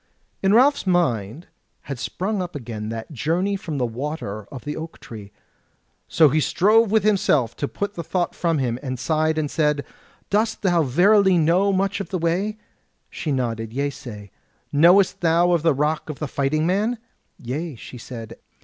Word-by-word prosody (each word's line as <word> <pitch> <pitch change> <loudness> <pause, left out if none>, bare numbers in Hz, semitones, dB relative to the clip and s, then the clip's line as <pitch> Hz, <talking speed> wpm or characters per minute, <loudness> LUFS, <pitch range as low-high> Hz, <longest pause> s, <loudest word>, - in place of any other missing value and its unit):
In 195 - +2
Ralph's 270 -2 +4
mind 150 - 0 0.4
had 140 -3 -7
sprung 195 - -2
up 175 -3 -6
again 110 -5 -5
that 115 +5 -6
journey 170 - 0
from 165 -6 -5
the 125 - +1
Water 115 -4 -5
of 130 -4 -9
the 150 0 -3
Oak 160 +1 -8
tree; 105 -3 -10 0.8
so 155 -3 +5
he 155 +4 +2
strove 215 +8 +3
with 220 -1 +2
himself 155 - +2
to 145 - -2
put 205 +6 -4
the 170 - -5
thought 175 +2 -1
from 165 -2 0
him, 125 -3 -1
and 130 -3 -4
sighed 155 +4 0
and 150 -2 -1
said: 150 -2 +1 0.5
"Dost 215 +2 0
thou 175 -3 +3
verily 190 - +4
know 175 +5 +3
much 195 +1 0
of 200 - -5
the 185 - -2
way?" 180 +6 -1 0.5
She 155 - -4
nodded 115 -4 -2
yeasay. 125 -7 -5 0.4
"Knowest 175 +6 +5
thou 170 +1 +3
of 170 -2 +2
the 160 -3 +2
Rock 150 +3 -1
of 150 - -5
the 150 - -4
Fighting 140 +4 0
Man?" 210 +7 +1 0.4
"Yea," 145 +5 -4
she 125 +2 -10
said. 115 -1 -9
155 Hz, 175 wpm, -22 LUFS, 130-185 Hz, 0.8 s, so